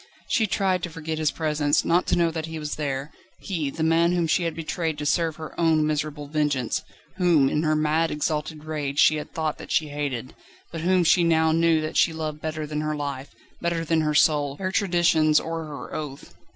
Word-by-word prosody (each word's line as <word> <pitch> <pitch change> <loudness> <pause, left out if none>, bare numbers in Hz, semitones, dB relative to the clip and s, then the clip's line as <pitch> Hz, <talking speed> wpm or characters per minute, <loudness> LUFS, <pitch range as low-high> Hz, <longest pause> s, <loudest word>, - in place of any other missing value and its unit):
She 220 - +2
tried 190 -2 +1
to 175 - -3
forget 160 -1 -5
his 155 -1 +2
presence, 150 -2 0
not 175 +2 +2
to - - +2
know 170 -1 +2
that 160 0 -4
he 160 0 -6
was 150 -1 -4
there 140 -1 -3 0.3
he, 165 -7 -3
the 160 +3 -4
man 165 +2 +3
whom 175 -1 +1
she 160 - +2
had 165 -2 -2
betrayed 160 -1 -3
to 150 - -4
serve 165 +1 +1
her 155 -1 -8
own 160 -2 +3
miserable 150 -1 -2
vengeance, 145 -5 0 0.4
whom 170 -7 +4
in 150 - 0
her 155 -1 +1
mad, 155 +2 +1
exalted 150 0 -2
rage 150 -3 -4
she 155 +1 +5
had 150 - -7
thought 155 -2 -2
that - - -9
she 155 -1 +1
hated, 140 -4 -4 0.4
but 165 - -5
whom 180 +1 +3
she 170 +1 +4
now 160 -1 +3
knew 165 0 +3
that 155 - -3
she 165 - +4
loved 155 -1 -4
better 155 -1 -3
than 150 0 -3
her 155 0 -2
life, 140 -2 -4 0.3
better 170 -1 -1
than 165 0 +2
her 150 -1 0
soul, 145 -2 +3
her 185 -1 -2
traditions, 170 -6 +3
or 165 0 -4
her 145 -2 -8
oath. 145 -3 -6
155 Hz, 215 wpm, -25 LUFS, 150-165 Hz, 0.4 s, she